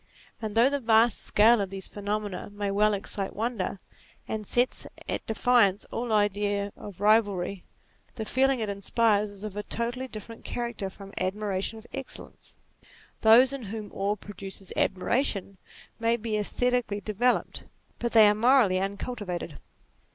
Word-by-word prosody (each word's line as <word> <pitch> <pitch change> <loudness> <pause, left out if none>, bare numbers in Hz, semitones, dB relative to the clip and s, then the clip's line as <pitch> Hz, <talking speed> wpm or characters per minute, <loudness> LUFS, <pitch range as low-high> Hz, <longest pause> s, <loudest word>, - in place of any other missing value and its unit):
And 215 -2 -4
though 235 +3 +6
the 285 +1 0
vast 230 -1 +3
scale 220 +1 +4
of 195 - -2
these 195 -1 -5
pheno 205 +1 -2
mena 205 -2 -6
may 205 -1 -3
well 210 +1 +3
excite 195 0 -5
wonder, 215 -4 -2 0.5
and 215 -2 -4
sets 245 +1 +2 0.2
at - - -3
defiance 220 -3 +3
all 235 0 -3
idea 205 -1 +1
of 200 -4 -10
rivalry, 200 -3 +2 0.5
the 220 - -4
feeling 265 +3 +2
it 220 - -1
inspires 205 +1 +1
is 200 0 -12
of 210 -2 -6
a 210 - -2
totally 240 +5 -3
different 225 0 -10
character 235 -5 -3
from 195 +1 -12
admiration 195 +2 -2
of 220 - -12
excellence. - - -8 0.6
Those 245 +4 +6
in 270 -5 -5
whom 210 0 -6
awe 200 +2 0
produces 195 -1 -7
admiration 195 -1 0 0.4
may 230 +1 +2
be 225 -1 -3
aesthetically 240 0 0
developed, 220 +5 0 0.3
but 235 0 -2
they 220 -2 +8
are 205 - +5
morally 230 -3 +4
uncul 200 +6 -3
tivated. 180 -8 -5
210 Hz, 150 wpm, -27 LUFS, 200-235 Hz, 0.6 s, they